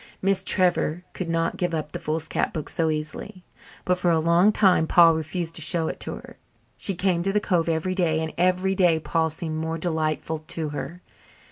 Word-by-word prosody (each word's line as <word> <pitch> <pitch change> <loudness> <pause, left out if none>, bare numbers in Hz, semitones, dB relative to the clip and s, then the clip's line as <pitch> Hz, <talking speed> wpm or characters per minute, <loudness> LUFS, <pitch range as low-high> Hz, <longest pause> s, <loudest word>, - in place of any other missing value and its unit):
Miss 195 0 +2
Trevor 180 -3 +2 0.2
would 180 -3 -3
not 165 0 -1
give 175 -2 -1
up 150 -1 -4
the - - -5
foolscap 155 +1 -2
book 155 -3 -4
so 165 -1 0
easily, 155 +4 -5 0.4
but 180 0 +1
for 180 - +1
a 165 - +3
long 170 +5 +4
time 185 -6 +3
Paul 165 -1 +6
refused 160 +1 -3
to - - -3
show 165 +1 +1
it - - -6
to - - -4
her. - - -12 0.4
She 195 - -2
came 180 -1 +1
to 195 +3 0
the 210 - +2
cove 175 -5 0
every 165 +3 -1
day, 170 -4 +1
and 160 -1 -4
every 185 +2 +1
day 175 -4 +3
Paul 160 0 0
seemed 160 0 -3
more 160 +1 -3
delightful 160 -1 -2
to 155 0 -4
her. 145 +4 -7
165 Hz, 205 wpm, -24 LUFS, 160-180 Hz, 0.4 s, Paul